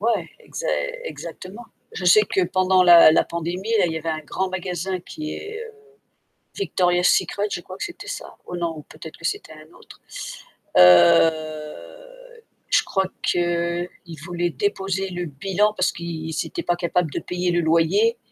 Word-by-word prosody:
Ouais, 210 -6 0
exa - - -7 0.4
exactement. 220 - -8 0.3
Je 180 - -6
sais 210 +4 +7
que 195 -2 0
pendant 185 +1 +3
la 175 -3 +9
la - - +4
pandémie, 175 +5 -4
là, 190 - +4
il 165 - -2
y 160 - -4
avait 165 +1 -3
un 155 0 -3
grand 185 +5 -3
magasin 185 0 -3
qui 155 -3 -7
est, 435 +1 -7
heu, 455 - -11 0.8
Victoria's 180 - +1
secret, 205 +1 +1
je - - -2
crois 185 +1 -10
que - - -4
c'était 345 - -8
ça. - - -7
Oh 180 - -5
non, 165 -3 -3
peut-être 160 - -11
que - - -19
c'était 170 - -3
un 155 +1 -15
autre. - - -16 0.8
Heu, 155 - +3 0.3
je - - +4
crois 190 -1 0 0.2
qu'ils 175 0 0 0.4
voulaient 175 0 -1
déposer 195 +1 -2
le 180 -1 -4
bilan, 195 +8 0
parce 185 -3 +1
qu'ils 165 -2 -6
ils 160 - -2
étaient 345 -2 -5
pas 175 - +1
capable 175 -2 -1
de - - -3
payer 180 0 -2
le 175 0 +1
loyer, 170 +8 +2
175 Hz, 170 wpm, -22 LUFS, 165-195 Hz, 0.8 s, la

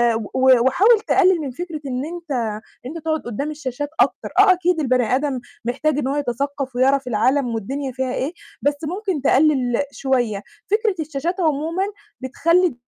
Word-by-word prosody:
و 225 - -2
و 260 -1 +5
وحاول 415 - +5
تقلِّل 375 -3 +4
من 280 -3 -4
فكرة 325 +3 -6
إن 255 +1 -2
أنت 340 -1 -8
إن 220 -5 -2 0.2
أنت 300 +6 -6
تقعُد 315 -1 0
قدّام 275 +6 -3
الشاشات 290 -1 -4
أكتر، - - +1
آه، 395 -2 +8
أكيد 360 -1 0
البَني 255 -4 +2
آدم 275 -2 -1 0.3
محتاج 275 +5 0
إنه 270 -2 -1
هو - - -1
يتثقّف 275 0 -3
ويعرف 270 +1 +2
العالم 250 +2 +1
والدنيا 265 +6 -3
فيها 260 0 -2
إيه، 280 +6 -2 0.3
بس 290 - +2
ممكن 365 0 -2
تقلِّل 270 -2 +3
شوية 245 -8 -1 0.3
فكرة 425 -2 +2
الشاشات 315 +4 -3
عمومًا 320 +4 0 0.4
بتخلّي 335 +3 +2
280 Hz, 165 wpm, -21 LUFS, 255-325 Hz, 0.4 s, آه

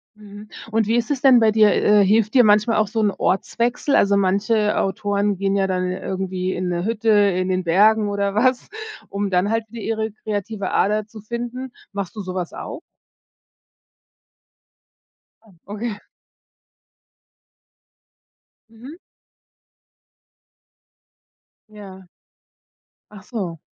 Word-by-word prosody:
Mhm. 210 0 -13 0.2
Und 220 -1 +1
wie 230 - +1
ist 240 +2 0
es 275 -3 -1
denn 260 -3 +6
bei 220 -1 +4
dir? 215 -1 +5
Äh, 210 -1 +4
hilft 215 +2 +2
dir 250 -2 +6
manchmal 210 +2 +3
auch 215 -1 +2
so 225 +3 -3
'n 210 -1 +2
Ortswechsel? 235 +9 -1
Also 200 0 +3
manche 210 +3 +1
Autoren 200 0 -1
gehen 195 0 0
ja 195 -1 +1
dann 185 -1 -1
irgendwie 185 0 -3
in 180 +1 -3
'ne 175 -1 -2
Hütte 225 +2 -1
in 200 -3 +3
den 185 0 0
Bergen 205 +5 +3
oder 200 0 -2
was, 250 +3 +1 0.4
um 200 0 -2
dann 185 +2 +1
halt 225 +1 0
wieder 230 0 -8
ihre 220 0 -2
kreative 205 -1 -4
Ader 210 +2 +1
zu 215 -1 -12
finden. 240 +3 -6 0.2
Machst 200 +1 -5
du 210 - -5
so 185 -1 -6
was 180 -2 -3
auch? - - -7 2.6
Ah, 220 - -22 0.2
okay. 210 +1 -5 2.7
Mhm. 240 +7 -12 2.7
Ja. 195 -3 -12 1.1
Ach 200 -2 -12
so. 195 -8 -5
210 Hz, 130 wpm, -21 LUFS, 195-225 Hz, 2.7 s, denn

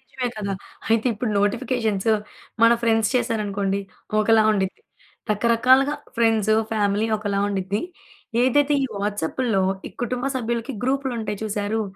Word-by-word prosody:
నిజమే 260 -3 -4
కదా! 200 -2 -3 0.4
అయితే 225 +2 +3
ఇప్పుడు 215 +1 -2
నోటిఫికేషన్స్ 225 -1 0 0.5
మన 230 - +7
ఫ్రెండ్స్ 225 -2 +2
చేశారనుకోండి, 205 -5 0 0.4
ఒకలా 220 +1 +4
ఉండిద్ది. 190 -2 -2 0.5
రకరకాలుగా 255 +6 +4 0.2
ఫ్రెండ్స్, 225 -2 +3 0.2
ఫ్యామిలీ 210 0 +1
ఒకలా 205 -2 -2
ఉండిద్ది. 200 +1 -2 0.6
ఏదైతే 285 +3 +3
ఈ - - 0
వాట్సాప్పుల్లో 205 +2 0 0.2
ఈ - - -4
కుటుంబ 250 +1 -2
సభ్యులకి 235 +1 -2
గ్రూపులుంటాయి 250 -5 -1
చూసారూ, 210 +1 -1
225 Hz, 115 wpm, -23 LUFS, 205-245 Hz, 0.6 s, మన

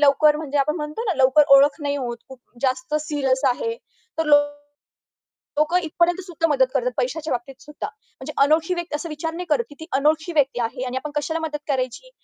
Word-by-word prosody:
लवकर 295 +1 +5
म्हणजे 295 -2 -2
आपण 300 +3 +1
म्हणतो 300 +7 -4
ना 390 -6 0
लवकर 265 +3 +5
ओळख 280 +1 +5
नाही 285 0 -1
होत. 240 -3 -3
खूप 265 -1 -12 0.2
जास्त 255 +2 -1
सीरियस 280 -4 0
आहे. 460 - -1 0.4
तर 320 - +2
लो 295 -1 +7 1.2
लोकं 305 +4 +3
इथपर्यंत 345 +3 +1
सुद्धा 330 -2 -1
मदत 265 -3 +3
करतात. 250 -2 0
पैशाच्या 295 +5 -2
बाबतीत 265 +2 -6
सुद्धा. 300 +6 -6
म्हणजे 430 0 -11
अनोळखी 315 +4 +2
व्यक्त 345 -3 -4
असं 300 +3 -4
विचार 320 +2 -4
नाही 360 +2 -5
करत, 285 -6 +2
की 290 - -13
ती 320 - -7
अनोळखी 310 +4 +1
व्यक्ती 275 -4 +2
आहे 245 +2 -2
आणि 255 +1 -3
आपण 295 +2 -5
कशाला 305 +3 -1
मदत 315 -2 -3
करायची? 260 - -2
295 Hz, 195 wpm, -22 LUFS, 265-320 Hz, 1.2 s, लो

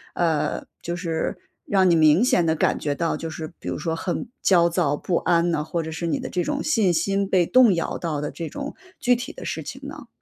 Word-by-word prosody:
呃， 165 -4 0 0.2
就 170 +1 -4
是 165 -2 -2 0.3
让 190 -2 +3
你 170 - +5
明 155 +6 +5
显 250 -10 +3
地 160 -1 +1
感 - - +2
觉 145 -1 -1
到， 165 +3 -1
就 165 - -5
是 160 +1 -7
比 - - -6
如 - - -3
说 160 +1 -2
很 175 +8 -3
焦 175 -3 +5
躁 165 -4 +1
不 175 - -2
安 170 +1 +2
呢？ 150 -3 0
或 165 +2 -2
者 160 0 -6
是 170 - -4
你 165 - 0
的 - - -5
这 180 -1 -1
种 295 -1 -2
信 215 - +2
心 195 +3 +1
被 185 -3 +3
动 245 +1 +6
摇 170 -2 -2
到 160 -4 -3
的 150 0 -3
这 165 -2 -6
种 285 0 -6 0.2
具 245 0 +3
体 250 +3 -5
的 - - -10
事 - - -3
情 - - -7
呢？ - - -9
170 Hz, 260 characters per minute, -23 LUFS, 160-195 Hz, 0.3 s, 动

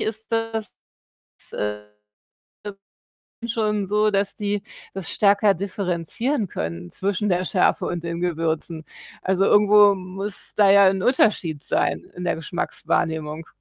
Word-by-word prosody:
ist 220 +1 -4
das, 225 0 0 2.9
äh, - - -7
äh, - - -4
schon 210 -3 0
so, 210 +2 +2
dass 200 0 0
die 205 -1 -2 0.3
das 195 -3 -5
stärker 200 -1 +3
differenzieren 200 - -2
können 85 - -5
zwischen 200 +1 -1
der 180 +1 +1
Schärfe 185 - +1
und 170 -1 -4
den 170 0 -4
Gewürzen. 165 -1 -2 0.4
Also, 190 +1 +1
irgendwo 205 0 +6
muss 195 +2 -6
da 205 -2 +5
ja 200 0 +7
'n 190 0 0
Unterschied 185 - +2
sein - - -1
in 180 - -5
der 175 - 0
Geschmackswahrnehmung. 160 -1 -2
195 Hz, 130 wpm, -23 LUFS, 170-210 Hz, 2.9 s, ja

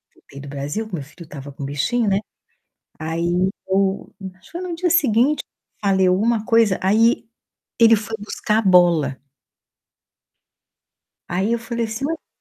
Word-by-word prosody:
voltei 140 - -14
do 140 - -10
Brasil, 145 +10 -4
que 205 - -17
meu 150 - -5
filho 160 +5 -13
estava 145 -3 -9
com 140 - -9
o - - -2
bichinho, 205 - 0
né, 195 - +2 0.8
aí 170 +3 0 0.2
eu 195 0 0 0.2
acho 185 - -23
que - - -19
foi 345 - -5
no 340 - -3
dia 350 0 -1
seguinte, 280 -3 +3 0.4
falei 190 -2 +2
alguma 215 +4 +2
coisa, 225 -5 +3
aí 220 +5 +3 0.5
ele 230 -1 +7
foi 220 +1 -4
buscar 210 +1 -1
a - - +1
bola. 175 -8 +4 2.1
Aí 190 +5 0
eu 235 - 0
falei 235 0 -3
assim: 225 +5 -4
"Mas 325 +3 -1
por - - -50
200 Hz, 165 wpm, -21 LUFS, 170-230 Hz, 2.1 s, ele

